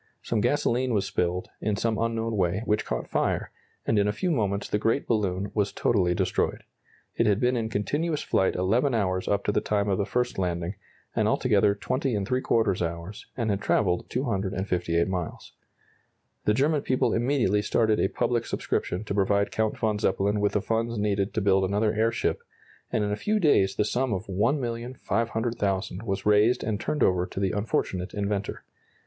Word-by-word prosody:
Some 110 Hz, -3 st, 0 dB
gasoline 125 Hz, -1 st, +1 dB
was 100 Hz, -2 st, +1 dB
spilled, 90 Hz, -2 st, -1 dB
in 105 Hz, -1 st, 0 dB
some 110 Hz, +1 st, -1 dB
unknown 115 Hz, 0 st, -1 dB
way, 95 Hz, +2 st, 0 dB
which 105 Hz, 0 st, +1 dB
caught -, -, -3 dB
fire, -, -, -1 dB, 0.3 s
and 110 Hz, -, +2 dB
in 100 Hz, -, +2 dB
a -, -, +2 dB
few 140 Hz, -, -1 dB
moments 105 Hz, -7 st, 0 dB
the 105 Hz, -, 0 dB
great 115 Hz, +6 st, +1 dB
balloon 100 Hz, -3 st, 0 dB
was 105 Hz, -2 st, 0 dB
totally 90 Hz, -6 st, +1 dB
destroyed. -, -, 0 dB, 0.5 s
It 115 Hz, -, +3 dB
had 100 Hz, -1 st, +3 dB
been 125 Hz, +1 st, +2 dB
in 115 Hz, -2 st, -1 dB
continuous 145 Hz, +9 st, -1 dB
flight 95 Hz, -, +1 dB
11 115 Hz, +8 st, +2 dB
hours 95 Hz, -4 st, 0 dB
up 100 Hz, 0 st, +1 dB
to -, -, +1 dB
the -, -, +1 dB
time 105 Hz, -1 st, 0 dB
of 95 Hz, -, +1 dB
the 100 Hz, -, 0 dB
first 125 Hz, -4 st, -1 dB
landing, 90 Hz, 0 st, -1 dB, 0.4 s
and 110 Hz, -2 st, +2 dB
altogether 105 Hz, -3 st, +3 dB
20¾ 115 Hz, -3 st, 0 dB
hours, 85 Hz, +4 st, -5 dB
and 115 Hz, -4 st, 0 dB
had 100 Hz, 0 st, -1 dB
travelled 90 Hz, -4 st, +1 dB
258 95 Hz, -7 st, -1 dB
miles. 90 Hz, -3 st, -4 dB, 0.9 s
The 105 Hz, -, +3 dB
German 145 Hz, +4 st, +2 dB
people 130 Hz, -2 st, +1 dB
immediately 120 Hz, -4 st, +2 dB
started 110 Hz, +1 st, +2 dB
a -, -, +3 dB
public 120 Hz, +3 st, -1 dB
subscription 90 Hz, +4 st, -2 dB
to 105 Hz, -, -4 dB
provide 100 Hz, 0 st, +2 dB
Count 110 Hz, -1 st, 0 dB
von 110 Hz, -2 st, 0 dB
Zeppelin 100 Hz, 0 st, +1 dB
with 105 Hz, 0 st, +1 dB
the 105 Hz, -, +1 dB
funds 115 Hz, +2 st, -1 dB
needed 100 Hz, -1 st, 0 dB
to 110 Hz, -, +1 dB
build 95 Hz, -1 st, +3 dB
another 105 Hz, +3 st, +1 dB
airship, 115 Hz, +1 st, 0 dB, 0.5 s
and 110 Hz, -, +1 dB
in 105 Hz, -, -1 dB
a -, -, +1 dB
few 210 Hz, -, 0 dB
days 100 Hz, -, +3 dB
the 105 Hz, -, +1 dB
sum 125 Hz, +2 st, 0 dB
of 95 Hz, +3 st, -3 dB
$1,500,000 115 Hz, -3 st, -1 dB
was 95 Hz, -4 st, -3 dB
raised 105 Hz, +3 st, +4 dB
and 105 Hz, -2 st, -1 dB
turned 150 Hz, +6 st, 0 dB
over 90 Hz, -1 st, +2 dB
to -, -, -6 dB
the 95 Hz, -2 st, +1 dB
unfortunate 95 Hz, -3 st, -2 dB
inventor. 100 Hz, -1 st, -2 dB
105 Hz, 180 wpm, -26 LUFS, 95-115 Hz, 0.9 s, raised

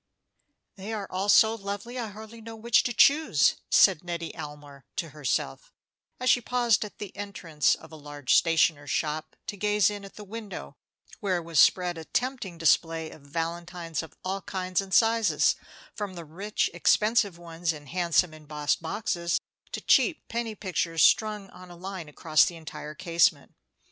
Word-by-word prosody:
"They 200 Hz, +3 st, -6 dB
are 205 Hz, -2 st, -3 dB
all 195 Hz, +2 st, -2 dB
so 220 Hz, +2 st, +6 dB
lovely, 205 Hz, +3 st, -5 dB
I 235 Hz, -, -3 dB
hardly 220 Hz, +2 st, -11 dB
know 225 Hz, 0 st, -9 dB
which 225 Hz, +1 st, +3 dB
to 245 Hz, -, 0 dB
choose," 290 Hz, +7 st, +4 dB
said 185 Hz, -5 st, +5 dB
Nettie 170 Hz, -1 st, -5 dB
Almer 145 Hz, -3 st, -9 dB
to 165 Hz, -, -3 dB
herself, 150 Hz, -, -3 dB, 0.5 s
as 255 Hz, -, -3 dB
she 245 Hz, -, +3 dB
paused 240 Hz, -2 st, +2 dB
at 210 Hz, -, -10 dB
the 205 Hz, -3 st, -8 dB
entrance 180 Hz, -7 st, 0 dB
of 160 Hz, -, -15 dB
a -, -, -10 dB
large 145 Hz, -3 st, -2 dB
stationer's 160 Hz, -3 st, +3 dB
shop 155 Hz, 0 st, -2 dB
to -, -, -5 dB
gaze 210 Hz, 0 st, +2 dB
in 205 Hz, -1 st, -7 dB
at 195 Hz, -, -12 dB
the 210 Hz, -, -9 dB
window, 205 Hz, -, -8 dB, 0.4 s
where 185 Hz, -3 st, 0 dB
was 165 Hz, -2 st, -1 dB
spread 180 Hz, -2 st, +4 dB
a 160 Hz, -, -9 dB
tempting 245 Hz, -8 st, -2 dB
display 165 Hz, 0 st, +2 dB
of -, -, -14 dB
valentines 165 Hz, +2 st, -4 dB
of 160 Hz, -, -12 dB
all 195 Hz, +1 st, -2 dB
kinds 185 Hz, -2 st, -2 dB
and 195 Hz, -1 st, -10 dB
sizes, 225 Hz, +2 st, +3 dB, 0.4 s
from 205 Hz, -4 st, -5 dB
the 170 Hz, -1 st, -8 dB
rich, 195 Hz, +7 st, -1 dB
expensive 210 Hz, -4 st, +2 dB
ones 170 Hz, 0 st, -3 dB
in 150 Hz, -2 st, -9 dB
handsome 175 Hz, +1 st, +1 dB
embossed 150 Hz, -1 st, -2 dB
boxes 170 Hz, -1 st, -1 dB, 0.3 s
to -, -, -4 dB
the -, -, -31 dB
cheap 340 Hz, -6 st, +3 dB
penny 230 Hz, -2 st, -3 dB
pictures 175 Hz, -5 st, 0 dB
strung 210 Hz, -2 st, +3 dB
on 180 Hz, 0 st, -13 dB
a 175 Hz, -, -11 dB
line 180 Hz, -2 st, -7 dB
across 155 Hz, +1 st, +3 dB
the 175 Hz, -, -1 dB
entire 155 Hz, -1 st, -8 dB
casement. 170 Hz, -1 st, +1 dB
180 Hz, 170 wpm, -27 LUFS, 160-210 Hz, 0.5 s, so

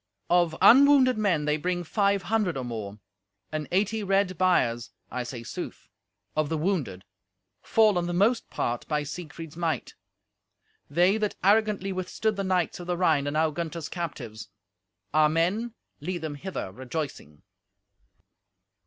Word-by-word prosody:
"Of 175 Hz, -2 st, +3 dB
unwounded 265 Hz, -2 st, +7 dB
men 175 Hz, -8 st, +1 dB
they 150 Hz, 0 st, +1 dB
bring 175 Hz, +3 st, -2 dB
five 200 Hz, +2 st, +1 dB
hundred 205 Hz, -6 st, 0 dB
or 130 Hz, -, -3 dB
more, 105 Hz, -4 st, -5 dB, 0.5 s
and 155 Hz, -1 st, -3 dB
eighty 210 Hz, +4 st, +1 dB
red 195 Hz, -1 st, +1 dB
biers 125 Hz, -11 st, +2 dB, 0.2 s
(I 125 Hz, -, -2 dB
say 120 Hz, -1 st, -6 dB
sooth) -, -, -7 dB, 0.5 s
of 155 Hz, -1 st, +1 dB
the 160 Hz, -, -1 dB
wounded, 150 Hz, -, -2 dB, 0.6 s
fallen, 210 Hz, -6 st, +3 dB
the -, -, -2 dB
most 215 Hz, +7 st, +2 dB
part, 120 Hz, 0 st, -2 dB
by 150 Hz, -1 st, 0 dB
Siegfried's 160 Hz, +1 st, -8 dB
might. 165 Hz, -6 st, -2 dB, 1.0 s
They 175 Hz, +7 st, +3 dB
that 210 Hz, -1 st, -1 dB
arrogantly 205 Hz, -1 st, +3 dB
withstood 185 Hz, +4 st, -1 dB
the 195 Hz, -, -2 dB
knights 185 Hz, -3 st, 0 dB
of 175 Hz, -, -8 dB
the 175 Hz, -1 st, -1 dB
Rhine 155 Hz, -6 st, +2 dB
are -, -, +1 dB
now 155 Hz, +2 st, +1 dB
Gunther's 165 Hz, 0 st, -4 dB
captives. 120 Hz, -, -6 dB, 0.6 s
Our 155 Hz, 0 st, +5 dB
men 195 Hz, +9 st, 0 dB, 0.2 s
lead 175 Hz, +2 st, -4 dB
them 155 Hz, -2 st, -3 dB
hither 145 Hz, -, -5 dB
rejoicing." 130 Hz, -, -6 dB
175 Hz, 145 wpm, -27 LUFS, 150-195 Hz, 1.0 s, unwounded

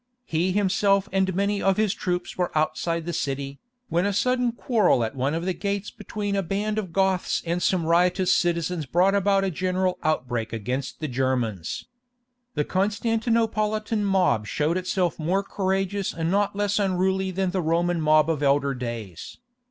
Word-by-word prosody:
He 170 Hz, +4 st, 0 dB
himself 195 Hz, 0 st, +2 dB
and 190 Hz, -1 st, +1 dB
many 200 Hz, +1 st, 0 dB
of 195 Hz, -1 st, +2 dB
his 215 Hz, -2 st, +2 dB
troops 180 Hz, -3 st, -3 dB
were 180 Hz, -1 st, -1 dB
outside 160 Hz, +2 st, 0 dB
the 175 Hz, -, -3 dB
city, 140 Hz, -1 st, -3 dB, 0.3 s
when 175 Hz, -1 st, +1 dB
a 205 Hz, -, 0 dB
sudden 250 Hz, +3 st, +1 dB
quarrel 220 Hz, -, +2 dB
at 110 Hz, +4 st, -3 dB
one 135 Hz, +4 st, 0 dB
of 165 Hz, +1 st, -3 dB
the 185 Hz, -, 0 dB
gates 200 Hz, +1 st, -3 dB
between 205 Hz, -1 st, -4 dB
a 195 Hz, -, +1 dB
band 205 Hz, +4 st, -1 dB
of 190 Hz, -5 st, -5 dB
Goths 190 Hz, 0 st, +1 dB
and 170 Hz, +1 st, -1 dB
some 180 Hz, -2 st, +1 dB
riotous 180 Hz, +2 st, +3 dB
citizens 170 Hz, -2 st, 0 dB
brought 180 Hz, +7 st, +3 dB
about 200 Hz, 0 st, +2 dB
a 195 Hz, -, 0 dB
general 185 Hz, +2 st, -1 dB
outbreak 125 Hz, -7 st, -1 dB
against 130 Hz, +6 st, -4 dB
the 155 Hz, -, -1 dB
Germans. 125 Hz, -, -2 dB, 0.7 s
The 150 Hz, -, 0 dB
Constantinopolitan 215 Hz, +1 st, 0 dB
mob 185 Hz, -, +2 dB
showed 150 Hz, +7 st, 0 dB
itself 185 Hz, -1 st, -1 dB
more 180 Hz, +5 st, 0 dB
courageous 195 Hz, 0 st, -1 dB
and 165 Hz, 0 st, -1 dB
not 200 Hz, 0 st, +1 dB
less 205 Hz, 0 st, 0 dB
unruly 190 Hz, 0 st, +1 dB
than 185 Hz, 0 st, -1 dB
the 185 Hz, 0 st, 0 dB
Roman 170 Hz, +1 st, +1 dB
mob 155 Hz, 0 st, +4 dB
of 160 Hz, -3 st, -1 dB
elder 140 Hz, 0 st, +2 dB
days. 115 Hz, -8 st, -6 dB
180 Hz, 165 wpm, -25 LUFS, 155-200 Hz, 0.7 s, mob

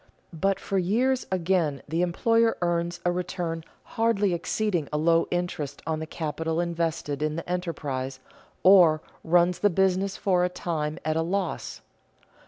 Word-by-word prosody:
But 195 Hz, +4 st, 0 dB
for 195 Hz, -, -1 dB
years 245 Hz, +8 st, +1 dB
again 170 Hz, -6 st, 0 dB
the 165 Hz, +3 st, -1 dB
employer 230 Hz, +6 st, +2 dB
earns 175 Hz, 0 st, -1 dB
a 175 Hz, -, +3 dB
return 175 Hz, -2 st, -3 dB, 0.2 s
hardly 215 Hz, -4 st, +1 dB
exceeding 175 Hz, -1 st, -1 dB
a 150 Hz, -, 0 dB
low 165 Hz, +2 st, +3 dB
interest 165 Hz, -5 st, -3 dB
on 160 Hz, -1 st, -1 dB
the 160 Hz, -, -5 dB
capital 160 Hz, +1 st, -3 dB
invested 165 Hz, -4 st, -2 dB
in 155 Hz, 0 st, 0 dB
the 165 Hz, -, -5 dB
enterprise, 145 Hz, -7 st, -3 dB, 0.4 s
or 175 Hz, -5 st, +6 dB, 0.2 s
runs 175 Hz, +1 st, +3 dB
the 205 Hz, -, +4 dB
business 190 Hz, +1 st, +1 dB
for 180 Hz, -3 st, +2 dB
a 180 Hz, -, +2 dB
time 155 Hz, -3 st, -3 dB
at 155 Hz, 0 st, 0 dB
a -, -, +2 dB
loss. 180 Hz, +1 st, -3 dB
175 Hz, 150 wpm, -26 LUFS, 160-185 Hz, 0.4 s, or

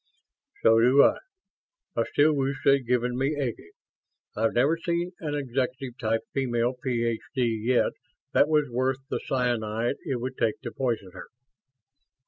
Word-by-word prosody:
"So 115 Hz, 0 st, +6 dB
do 125 Hz, +4 st, +6 dB
I. -, -, +4 dB, 0.8 s
I -, -, +1 dB
still 155 Hz, +2 st, +4 dB
wish 135 Hz, -1 st, 0 dB
they'd 140 Hz, -3 st, +4 dB
given 125 Hz, 0 st, +1 dB
me 135 Hz, +4 st, 0 dB
Eggy. 120 Hz, -11 st, -4 dB, 0.7 s
I've 110 Hz, +1 st, +1 dB
never 140 Hz, +7 st, +3 dB
seen 170 Hz, +1 st, -2 dB
an 150 Hz, -3 st, -3 dB
executive 130 Hz, -2 st, -3 dB
type 115 Hz, 0 st, 0 dB
female 120 Hz, -2 st, 0 dB
Ph.D. 120 Hz, +1 st, -1 dB
yet 115 Hz, +2 st, +1 dB, 0.4 s
that -, -, +5 dB
was 150 Hz, -1 st, +2 dB
worth 130 Hz, +2 st, 0 dB
the -, -, 0 dB
cyanide 120 Hz, -2 st, 0 dB
it 130 Hz, -3 st, -2 dB
would 130 Hz, +2 st, -5 dB
take 110 Hz, -, +1 dB
to 120 Hz, -4 st, -6 dB
poison 115 Hz, -8 st, -2 dB
her." -, -, -10 dB
125 Hz, 145 wpm, -26 LUFS, 115-140 Hz, 0.8 s, So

